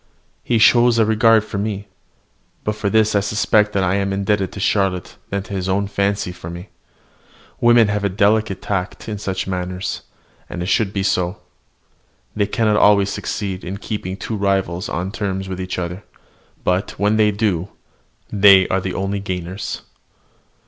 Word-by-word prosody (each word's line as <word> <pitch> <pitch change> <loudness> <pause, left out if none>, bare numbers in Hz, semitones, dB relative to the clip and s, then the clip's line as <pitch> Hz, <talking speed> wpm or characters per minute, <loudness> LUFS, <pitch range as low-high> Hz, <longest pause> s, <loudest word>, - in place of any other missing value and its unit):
He 120 - +1
shows 120 +2 +5
a 110 - +4
regard 110 0 +4
for 100 - -5
me, 100 -1 -3 0.8
but 105 - -1
for 105 -1 -2
this 110 0 +3
I 100 - +4
suspect 105 0 +1
I 95 -1 +2
am 100 0 0
more 95 - -1
indebted 100 -1 0
to - - -7
Charlotte 95 -3 0
than 100 0 -2
to 100 - -9
his 95 -1 -2
own 100 +2 +1
fancy 100 -2 -1
for 90 -2 -9
me. 85 +3 -8 0.9
Women 120 -2 +5
have 105 0 -1
a 100 - +2
delicate 105 0 +1
tact 100 -1 -3
in 105 -2 -4
such 95 -2 -3
matters, 90 0 -3 0.5
and 90 - -4
it 90 - -3
should 110 -3 +2
be 100 -1 -2
so. 90 -1 0 1.0
They 105 -1 +1
cannot 105 -1 +1
always 100 -1 +4
succeed 95 -3 -4
in 95 +3 -5
keeping 100 -3 -5
two 110 - -4
rivals 95 -3 -1
on 90 +3 -3
terms 95 -3 -3
with 95 -1 -5
each 95 0 -4
other; 90 +2 -4 0.6
but, 90 +3 -1
when 105 +1 +2
they 105 -1 +4
do, 100 -4 -1 0.6
they 100 -2 +6
are 95 - +1
the 95 0 -4
only 100 +1 -2
gainers. 95 0 -5
100 Hz, 170 wpm, -20 LUFS, 95-105 Hz, 1.0 s, they